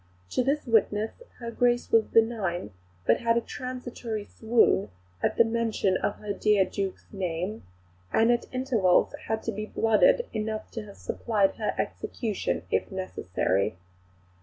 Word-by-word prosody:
To -, -, +1 dB
this 280 Hz, +4 st, 0 dB
witness 220 Hz, -, +1 dB, 0.2 s
her 235 Hz, -1 st, -6 dB
Grace 240 Hz, +1 st, +1 dB
was 225 Hz, -1 st, +5 dB
benign, 210 Hz, -, +1 dB, 0.3 s
but -, -, +4 dB
had 230 Hz, 0 st, +2 dB
a -, -, +2 dB
transitory 245 Hz, -4 st, -5 dB
swoon 220 Hz, -, +2 dB, 0.3 s
at -, -, 0 dB
the -, -, +8 dB
mention 225 Hz, -4 st, +1 dB
of 205 Hz, -, -1 dB
her 210 Hz, -1 st, -4 dB
dear 205 Hz, -1 st, +3 dB
Duke's 195 Hz, -1 st, -4 dB
name; 185 Hz, +2 st, -3 dB, 0.5 s
and 225 Hz, +2 st, +4 dB
at 240 Hz, -, -1 dB
intervals 240 Hz, -9 st, +2 dB
has 220 Hz, +1 st, -2 dB
been 215 Hz, -1 st, -3 dB
blooded 485 Hz, -, +4 dB
enough 215 Hz, 0 st, -3 dB
to 225 Hz, -2 st, -5 dB
have 200 Hz, -, -13 dB
supplied 210 Hz, -4 st, 0 dB
her 215 Hz, -, -1 dB
execution 220 Hz, -5 st, -2 dB
if -, -, 0 dB
necessary. 100 Hz, -, -1 dB
220 Hz, 140 wpm, -27 LUFS, 200-235 Hz, 0.5 s, the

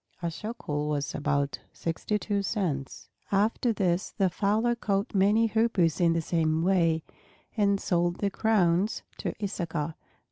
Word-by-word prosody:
(A 170 Hz, -, 0 dB
shekel 155 Hz, -7 st, -4 dB
was 145 Hz, -2 st, -2 dB
about 140 Hz, -1 st, -1 dB
sixty 170 Hz, +5 st, -2 dB
two 205 Hz, +1 st, -1 dB
cents.) 170 Hz, -, -3 dB, 0.2 s
After 215 Hz, +4 st, +2 dB
this 185 Hz, -4 st, 0 dB
the 190 Hz, -4 st, 0 dB
fowler 215 Hz, +6 st, +1 dB
caught 205 Hz, -1 st, -1 dB
many 205 Hz, +3 st, +4 dB
Hoopoes 210 Hz, -8 st, +2 dB
in 170 Hz, -1 st, +4 dB
the 165 Hz, -, 0 dB
same 160 Hz, -1 st, +1 dB
way, 170 Hz, -4 st, +2 dB, 0.5 s
and 200 Hz, -2 st, +2 dB
sold 175 Hz, -1 st, +1 dB
their 200 Hz, +1 st, -1 dB
crowns 200 Hz, -2 st, +2 dB, 0.2 s
to -, -, -3 dB
Issachar. 170 Hz, -5 st, -2 dB
185 Hz, 140 wpm, -28 LUFS, 165-210 Hz, 0.5 s, many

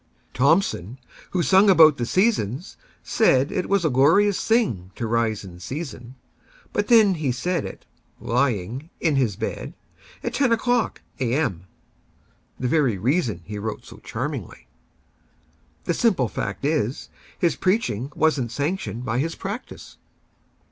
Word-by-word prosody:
Thomson, 130 Hz, -, +1 dB, 0.3 s
who 180 Hz, -2 st, 0 dB
sung 195 Hz, +3 st, +5 dB
about 160 Hz, -6 st, +7 dB
the 120 Hz, -, -2 dB
"Seasons," 180 Hz, -, 0 dB, 0.3 s
saidIt 165 Hz, -, +2 dB
was 200 Hz, -3 st, +1 dB
a -, -, +3 dB
glorious 165 Hz, +10 st, +4 dB
thing 165 Hz, -, +1 dB
to 115 Hz, -, -3 dB
rise 110 Hz, -2 st, 0 dB
in 90 Hz, -2 st, -11 dB
season; 130 Hz, -, -7 dB, 0.6 s
But 205 Hz, -, 0 dB
then 220 Hz, -5 st, +6 dB
he 155 Hz, -6 st, -1 dB
said 165 Hz, +6 st, -1 dB
it—lying—in 130 Hz, -, -3 dB
his 120 Hz, -7 st, +1 dB
bed, -, -, -5 dB, 0.5 s
At -, -, -3 dB
ten 270 Hz, -4 st, +2 dB
o'clock 240 Hz, +1 st, +1 dB, 0.2 s
A.M.,—the 125 Hz, -, -5 dB
very 130 Hz, -6 st, +2 dB
reasonHe 105 Hz, -, -1 dB
wrote 110 Hz, 0 st, -5 dB
so -, -, -12 dB
charmingly. -, -, -6 dB, 1.2 s
The 170 Hz, -, 0 dB
simple 185 Hz, -, +2 dB
fact 100 Hz, +4 st, -4 dB
is, 145 Hz, -5 st, -1 dB, 0.3 s
His 170 Hz, -, +1 dB
preaching 185 Hz, -, 0 dB
was 155 Hz, -3 st, +2 dB
n't 120 Hz, -, -3 dB
sanctioned 140 Hz, -, -3 dB
by 115 Hz, 0 st, -1 dB
his 165 Hz, +4 st, -2 dB
practice. 205 Hz, +6 st, -7 dB
140 Hz, 125 wpm, -23 LUFS, 115-185 Hz, 1.2 s, about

